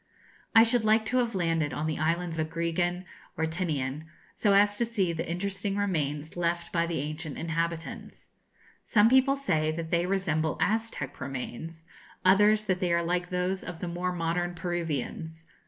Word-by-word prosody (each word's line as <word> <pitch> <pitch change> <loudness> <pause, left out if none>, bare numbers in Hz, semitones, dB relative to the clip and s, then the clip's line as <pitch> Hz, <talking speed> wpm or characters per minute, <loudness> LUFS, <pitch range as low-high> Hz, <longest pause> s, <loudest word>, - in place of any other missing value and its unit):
I 225 - +10
should 235 0 +2
like 220 0 +3
to 250 +3 0
have 235 -3 +1
landed 165 -5 0
on 150 - -2
the 155 -1 -2
islands 165 +1 0
Agrigan 170 +3 -1 0.3
or 160 - +1
Tinian, 155 -4 -2 0.3
so 205 -2 +2
as 205 +1 +5
to 235 - +2
see 200 -7 0
the 165 +1 -4
interesting 195 +3 -2
remains 155 -6 -1
left 170 0 -1
by 170 0 +2
the 170 - -2
ancient 155 0 -5
inhabitants. 165 0 -4 0.5
Some 215 +1 +4
people 265 +1 +5
say 160 - 0
that 160 +1 -4
they 170 +1 +2
resemble 160 -5 0
Aztec 220 - -1
remains; 140 +5 -6 0.4
others, 210 +3 +5
that 185 -3 0
they 180 -3 0
are 170 0 +2
like 175 +1 -1
those 180 +1 -1
of 175 -2 -6
the 180 - -5
more 175 +1 -2
modern 175 0 -1
Peruvians. 165 -1 -3
170 Hz, 165 wpm, -28 LUFS, 160-195 Hz, 0.5 s, I